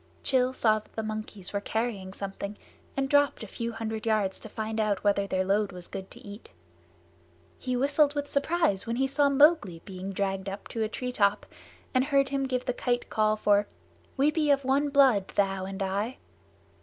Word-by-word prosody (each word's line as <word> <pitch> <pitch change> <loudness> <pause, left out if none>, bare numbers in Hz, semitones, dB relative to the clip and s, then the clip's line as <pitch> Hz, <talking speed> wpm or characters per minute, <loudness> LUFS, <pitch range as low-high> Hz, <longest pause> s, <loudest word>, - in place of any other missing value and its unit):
Rann 255 -1 +4
saw 215 -3 +3
that 215 - -22
the 220 - -3
monkeys 215 -3 -5
were 200 - -1
carrying 220 -3 -2
something, 200 +1 -6 0.4
and 270 0 +1
dropped 285 -3 +3
a - - -7
few 230 +4 -4
hundred 225 -1 -4
yards 210 -3 +1
to 220 - -10
find 220 +1 -4
out 210 -3 0
whether 200 -1 +2
their 185 -1 0
load 200 +1 +1
was 180 -1 -9
good 190 0 -7
to - - -13
eat. 205 +2 -10 1.1
He 255 - -2
whistled 285 +2 +3
with 290 0 -2
surprise 280 - +1
when 230 - -1
he 265 +2 +1
saw 280 +1 +2
Mowgli 280 - +4
being 190 -1 -6
dragged 195 0 -2
up 195 +1 -7
to 225 - -4
a 215 - 0
treetop 215 -4 0 0.5
and 255 -1 +3
heard 275 -1 +2
him 275 0 -1
give 255 -1 -2
the 250 - 0
Kite 245 0 -2
call 215 0 +2
for 205 -1 +2 0.5
"We 285 +3 +4
be 305 -2 0
of 280 -1 +3
one 280 +2 +2
blood, 265 -9 +4
thou 195 -1 +1
and 195 +1 -4
I." 200 +6 -2
220 Hz, 195 wpm, -28 LUFS, 200-270 Hz, 1.1 s, Rann